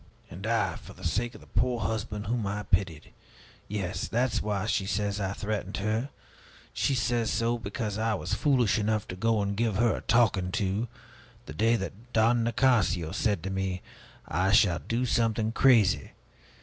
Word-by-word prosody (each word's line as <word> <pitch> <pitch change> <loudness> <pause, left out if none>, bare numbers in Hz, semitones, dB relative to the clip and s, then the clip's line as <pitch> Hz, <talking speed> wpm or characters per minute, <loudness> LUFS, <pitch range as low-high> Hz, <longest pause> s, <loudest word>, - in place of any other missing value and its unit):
And 95 +5 -6
I, 115 -1 +1
for - - -12
the - - -15
sake 115 +9 -1
of - - -12
the - - -15 0.2
poor 125 -2 0
husband, 105 0 -3
whom 115 -1 -1
I 105 +1 -3
pitied 90 -6 -1 0.5
Yes, 95 -3 -3
that 125 +1 0
is - - 0
why 105 -1 -1
she 105 -3 0
says 100 0 -1
that 100 -2 -1
I - - -3
threatened 105 -2 -3
her. 110 +6 -1 0.6
She 140 - +1
says 120 -1 0
so, 120 +1 0
because 105 0 -4
I 110 0 +1
was - - -4
foolish 125 -7 +2
enough 110 0 0
to 90 - -4
go 110 +2 +1
and 100 0 -2
give 110 -1 0
her 115 +2 +3
a - - -6
talking 110 -6 +2
to, 105 +1 0 0.6
the 75 - -8
day 115 +8 +3
that 115 +3 -6
Don 115 +1 +3
Nicasio 115 -9 +2
said 100 -7 0
to 95 - -3
me, 95 -1 -2 0.4
'I 95 +4 +1
shall 100 -6 +5
do 120 +2 -1
something 115 -2 +1
crazy!' 105 - +4
105 Hz, 185 wpm, -28 LUFS, 95-115 Hz, 0.6 s, shall